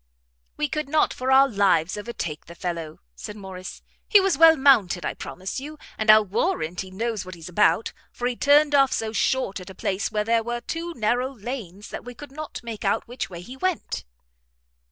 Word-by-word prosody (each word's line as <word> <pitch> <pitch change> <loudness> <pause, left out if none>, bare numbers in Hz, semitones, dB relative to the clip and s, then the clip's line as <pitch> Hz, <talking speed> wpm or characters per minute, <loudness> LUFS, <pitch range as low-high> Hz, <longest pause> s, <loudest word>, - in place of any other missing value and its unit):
"We 150 - 0
could 305 - -3
not 310 +1 +2
for 260 +1 -2
our 270 +1 +7
lives 195 -7 +2
overtake 205 -8 -5
the 170 - -11
fellow," 165 -3 -5
said 205 - -8
Morrice; 190 -2 -9 0.2
"he 415 - +7
was 390 -1 +2
well 325 0 +7
mounted, 220 -11 +4
I - - -1
promise 185 +7 -6
you, 300 +3 -8 0.2
and 220 0 -2
I'll 215 0 +8
warrant 190 - -1
he 190 - -8
knows 220 +2 -3
what 185 0 -9
he's 165 0 -10
about, 210 +4 +2 0.2
for 245 - -5
he 250 - -2
turned 290 +3 +4
off 275 -2 +5
so 220 -1 -2
short 230 -4 0
at 185 - -10
a 190 - -10
place 190 +2 -2
where 210 -1 0
there 230 0 +3
were 240 +1 -4
two 335 +4 -5
narrow 245 +3 0
lanes, 210 -5 -7
that - - -7
we 245 0 -9
could 290 +2 -11
not 310 +2 -7
make 230 -3 -6
out 200 - 0
which 245 +2 -5
way 175 -2 -8
he 250 +8 -10
went." 365 +4 -2
225 Hz, 205 wpm, -24 LUFS, 190-270 Hz, 0.2 s, I'll